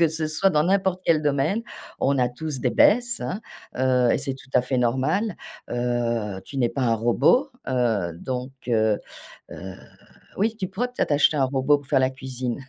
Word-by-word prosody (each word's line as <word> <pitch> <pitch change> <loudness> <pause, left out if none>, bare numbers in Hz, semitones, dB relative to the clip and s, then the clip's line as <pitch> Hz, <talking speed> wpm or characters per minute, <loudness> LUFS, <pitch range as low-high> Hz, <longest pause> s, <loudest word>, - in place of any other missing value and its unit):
que 165 - +5
ce 160 0 -2
soit 155 +5 +2
dans 150 -5 +2
n'importe 190 0 +1
quel 160 -2 +3
domaine, 150 +7 +1 0.4
on 140 +1 +2
a 125 -1 +2
tous 145 +1 -5
des 125 - +1
baisses, 240 - +3
hein, 190 - -3 0.4
heu, 125 -1 +3
et - - +3
c'est 140 -1 -3
tout 135 - -15
à 125 - +5
fait 130 +1 -1
normal. 135 - 0 0.3
Heu, 120 -5 -1
tu 140 - -9
n'es 120 -3 +1
pas 140 - -4
un 120 -3 +2
robot, 120 - +3 0.2
heu, 115 -9 0
donc, 125 +8 -5 0.2
heu 110 -3 +2 0.5
heu, 95 +1 -8 0.6
oui 220 +3 0
tu 190 -4 -3
pourrais 210 +7 -2
peut-être 245 - -2
acheter 150 +1 +3
un 135 - +3
robot 135 +2 +2
pour 140 -1 -14
faire 135 -2 +3
la 130 - +3
cuisine. 130 -2 -5
135 Hz, 195 wpm, -24 LUFS, 120-160 Hz, 0.6 s, que